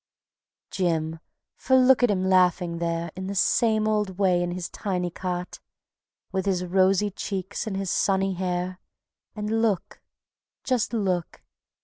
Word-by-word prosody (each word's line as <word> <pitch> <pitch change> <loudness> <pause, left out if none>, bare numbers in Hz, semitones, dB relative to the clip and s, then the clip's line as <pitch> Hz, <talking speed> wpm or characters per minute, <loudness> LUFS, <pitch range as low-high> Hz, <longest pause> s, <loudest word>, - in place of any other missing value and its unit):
Jim! 165 -3 -1 0.4
For 260 - +2
look 260 0 +5
at 245 - +4
him 190 -2 +1
laughing 180 -2 +2
there 170 0 -2
In 185 +1 -5
the 200 - -4
same 215 +3 +2
old 210 -4 0
way 185 -3 +3
in 175 - -1
his 175 0 -4
tiny 180 -4 -3
cot, 180 0 -4 0.7
With 190 0 -2
his 180 -2 0
rosy 190 +3 +2
cheeks 195 +2 -4
and 195 -3 -3
his 195 -2 -2
sunny 195 -1 +1
hair, 180 0 -3 0.6
And 215 +1 -1
look, 210 -6 -1 0.6
just 255 -4 0
look 190 -7 -2
190 Hz, 140 wpm, -25 LUFS, 180-205 Hz, 0.7 s, look